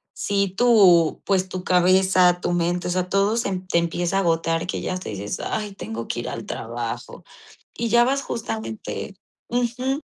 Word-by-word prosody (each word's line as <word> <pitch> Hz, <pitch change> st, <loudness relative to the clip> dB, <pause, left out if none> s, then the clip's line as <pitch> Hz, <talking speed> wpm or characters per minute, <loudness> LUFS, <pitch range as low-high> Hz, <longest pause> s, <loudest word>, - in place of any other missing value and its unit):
si 200 Hz, -1 st, 0 dB
tú, 195 Hz, -9 st, +5 dB
pues 190 Hz, -1 st, +1 dB
tu 185 Hz, -1 st, -5 dB
cabeza, 180 Hz, 0 st, +4 dB
tu 175 Hz, -, -1 dB
mente, 175 Hz, +1 st, 0 dB
o -, -, -1 dB
sea, 180 Hz, 0 st, -1 dB
todo 200 Hz, +3 st, +2 dB
se 230 Hz, -, -1 dB, 0.2 s
te 170 Hz, -, +2 dB
empieza 170 Hz, +2 st, -1 dB
a -, -, +3 dB
agotar, 165 Hz, -1 st, 0 dB
que -, -, -3 dB
ya -, -, -2 dB
hasta 185 Hz, -8 st, -5 dB
dices: 100 Hz, 0 st, -4 dB
"Ay, 210 Hz, -2 st, -3 dB
tengo 115 Hz, -9 st, -6 dB
que 120 Hz, -, -3 dB
ir -, -, -5 dB
al 115 Hz, -, -6 dB
trabajo", 115 Hz, 0 st, -5 dB, 0.5 s
y 235 Hz, 0 st, -2 dB
ya 235 Hz, +2 st, +5 dB
vas 275 Hz, +2 st, 0 dB
justamente 115 Hz, -, -5 dB, 0.3 s
Ujú. 245 Hz, +3 st, -1 dB
185 Hz, 180 wpm, -23 LUFS, 165-205 Hz, 0.5 s, tú